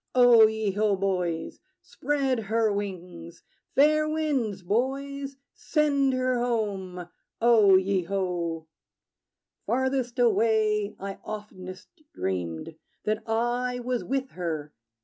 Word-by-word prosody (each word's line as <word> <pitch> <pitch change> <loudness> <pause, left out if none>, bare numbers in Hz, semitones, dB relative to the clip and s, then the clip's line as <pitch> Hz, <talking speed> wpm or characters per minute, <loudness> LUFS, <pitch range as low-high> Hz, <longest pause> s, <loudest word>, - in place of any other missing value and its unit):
O 240 -3 +8
ye 220 -2 -1
ho, 205 +1 +1
boys! 180 -4 -2 0.2
Spread 275 -4 -1
her 220 0 +1
wings! 180 -4 -6 0.3
Fair 305 +2 +4
winds, 270 -11 -1
boys: 275 +7 -2 0.2
send 285 -3 +1
her 255 -1 +1
home! 200 -7 -2 0.3
O 225 -4 +6
ye 190 0 +2
ho! 175 -4 -2 1.0
Farthest 260 -1 0
away, 215 -2 +2
I 195 0 -6
oftenest 185 -3 -8 0.3
dreamed 90 - -3 0.3
That 215 0 -1
I 240 +2 0
was 245 0 -2
with 265 0 -2
her. 155 -4 -4
215 Hz, 105 wpm, -27 LUFS, 185-255 Hz, 1.0 s, O